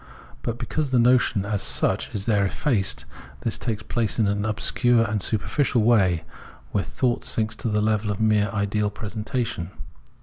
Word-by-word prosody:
But 120 0 -3
because 155 +2 -2
the 130 - +2
notion 120 -4 +3
as 105 -1 -1
such - - +2
is 100 -2 -4
there 105 -3 +2
effaced, 95 - 0 0.4
this - - -1
takes 110 -2 -3
place 115 -3 -1
in 110 - +3
an 100 +1 0
obscure 115 +2 +2
and 105 -1 -1
superficial 115 +4 +1
way, 95 -8 +3 0.5
where 100 - 0
thought 125 -2 -1
sinks 110 -1 -1
to 115 - -3
the 105 0 +1
level 105 0 +1
of 100 - -2
mere 105 -2 +3
ideal 105 +1 0
presentation. 105 -3 -4
110 Hz, 165 wpm, -24 LUFS, 100-120 Hz, 0.5 s, notion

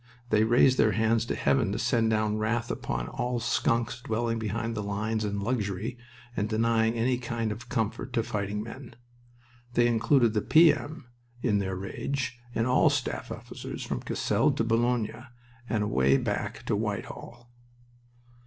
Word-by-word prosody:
They 105 0 +4
raised 120 +3 +4
their 110 - +4
hands 115 +2 +2
to - - -1
heaven 120 -7 +2
to - - -2
send 115 -2 +2
down 110 -1 +1
wrath 115 +2 -1
upon - - -3
all 125 0 -2
skunks 115 0 0
dwelling 115 0 -1
behind 110 +2 -2
the 105 - -3
lines 105 +2 -2
in 100 -1 -2
luxury 105 0 -2 0.4
and 105 +1 -1
denying 115 +1 +2
any 120 +2 +1
kind 115 -2 -2
of 120 +4 -8
comfort 115 +2 -2
to 115 - +1
fighting 105 -1 -3
men. 120 +2 -10 0.8
They 120 - +5
included 120 0 +3
the 105 - +1
P.M. 155 -1 +4 0.4
in 105 -5 +2
their 95 -1 -2
rage, 120 +6 -3 0.2
and 115 - +1
all 125 +1 +4
staff - - -2
officers - - -7
from - - -3
Cassel - - +1
to - - 0
Boulogne, 120 +1 0 0.4
and 105 -2 +1
away 70 -10 +3
back - - -3
to - - +1
Whitehall. 120 0 -5
115 Hz, 155 wpm, -28 LUFS, 105-120 Hz, 0.8 s, They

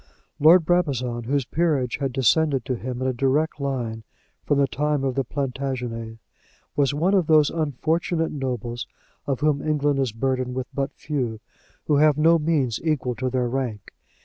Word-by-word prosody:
Lord 165 +3 +6
Brabazon, 130 -9 0
whose 135 +1 0
peerage 145 -6 0
had 135 -2 -2
descended 135 +2 +2
to 130 - -1
him 125 +2 -5
in - - 0
a 130 - 0
direct 140 +5 0
line 120 -5 -3 0.4
from 145 - +2
the 140 - +4
time 150 +1 -1
of 135 -1 0
the 135 +1 0
Plantagenets, 125 -4 -4 0.6
was 140 -1 +2
one 165 +7 +1
of 185 -5 +3
those 155 -2 +5
unfortunate 160 +2 -1
nobles 125 -3 -4 0.4
of 135 -1 -1
whom 150 -2 +2
England 145 -2 +1
is 130 -4 0
burdened 130 +2 -2
with 130 -1 -2
but 140 0 -2
few, 125 -8 -3 0.5
who 150 - +2
have 150 0 +4
no 165 +2 +5
means 150 -7 0
equal 150 -6 0
to 130 +2 -2
their 125 -1 0
rank. 120 -5 -4
135 Hz, 170 wpm, -24 LUFS, 125-150 Hz, 0.6 s, Lord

